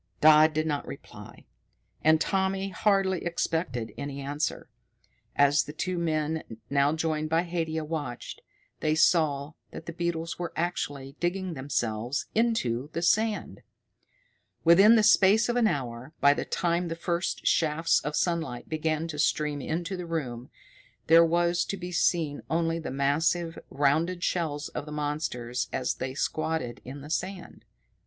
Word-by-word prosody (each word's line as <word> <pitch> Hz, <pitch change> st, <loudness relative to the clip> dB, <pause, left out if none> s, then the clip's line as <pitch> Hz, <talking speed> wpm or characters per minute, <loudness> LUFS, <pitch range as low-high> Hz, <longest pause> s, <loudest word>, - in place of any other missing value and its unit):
Dodd 155 Hz, 0 st, +7 dB
did 155 Hz, 0 st, +1 dB
not 145 Hz, -2 st, -2 dB
reply, -, -, -11 dB, 0.6 s
and 155 Hz, 0 st, +5 dB
Tommy 190 Hz, +2 st, 0 dB
hardly 195 Hz, -1 st, +1 dB
expected 160 Hz, -, -2 dB
any 140 Hz, -1 st, -5 dB
answer. 145 Hz, +2 st, -3 dB, 0.7 s
As 145 Hz, +1 st, +4 dB
the 150 Hz, -, -8 dB
two 180 Hz, +3 st, -2 dB
men, 155 Hz, -1 st, -1 dB, 0.3 s
now 140 Hz, 0 st, +3 dB
joined 155 Hz, -1 st, -1 dB
by 165 Hz, +2 st, +2 dB
Haidia, 165 Hz, -2 st, -2 dB
watched, 150 Hz, -6 st, -5 dB, 0.4 s
they 155 Hz, 0 st, +1 dB
saw 155 Hz, -3 st, +2 dB, 0.2 s
that -, -, -9 dB
the 170 Hz, -, -6 dB
beetles 170 Hz, -1 st, -3 dB
were 175 Hz, -1 st, -4 dB
actually 145 Hz, -5 st, -3 dB
digging 180 Hz, +1 st, -1 dB
themselves 120 Hz, -3 st, -2 dB
into 150 Hz, -, 0 dB
the 170 Hz, -, -2 dB
sand. 215 Hz, +4 st, +1 dB, 1.0 s
Within 195 Hz, +7 st, +7 dB
the 220 Hz, -, +4 dB
space 210 Hz, +1 st, +5 dB
of 240 Hz, -, +1 dB
an 240 Hz, -2 st, +4 dB
hour, 130 Hz, -, -4 dB
by 140 Hz, 0 st, +6 dB
the -, -, -3 dB
time 175 Hz, 0 st, 0 dB
the 165 Hz, -, -3 dB
first 170 Hz, +1 st, -2 dB
shafts 165 Hz, +1 st, +2 dB
of 150 Hz, 0 st, -4 dB
sunlight 165 Hz, -8 st, -1 dB
began 155 Hz, 0 st, -1 dB
to 150 Hz, -3 st, -6 dB
stream 150 Hz, -1 st, +1 dB
into 170 Hz, +6 st, -3 dB
the 180 Hz, -2 st, -6 dB
room, 130 Hz, -7 st, -4 dB, 0.6 s
there 165 Hz, +1 st, +7 dB
was 170 Hz, +1 st, +2 dB
to 195 Hz, -, -4 dB
be 180 Hz, -1 st, -6 dB
seen 165 Hz, -4 st, +1 dB
only 165 Hz, +1 st, 0 dB
the 160 Hz, -, -5 dB
massive, 160 Hz, +5 st, 0 dB
rounded 160 Hz, +6 st, +1 dB
shells 150 Hz, -4 st, -1 dB
of 145 Hz, -, -6 dB
the -, -, -7 dB
monsters 145 Hz, -5 st, -2 dB
as 125 Hz, -, -1 dB
they 130 Hz, 0 st, -5 dB
squatted 155 Hz, -5 st, -2 dB
in 135 Hz, +3 st, -8 dB
the 150 Hz, +2 st, -9 dB
sand. 185 Hz, +1 st, -4 dB
160 Hz, 150 wpm, -28 LUFS, 145-175 Hz, 1.0 s, Dodd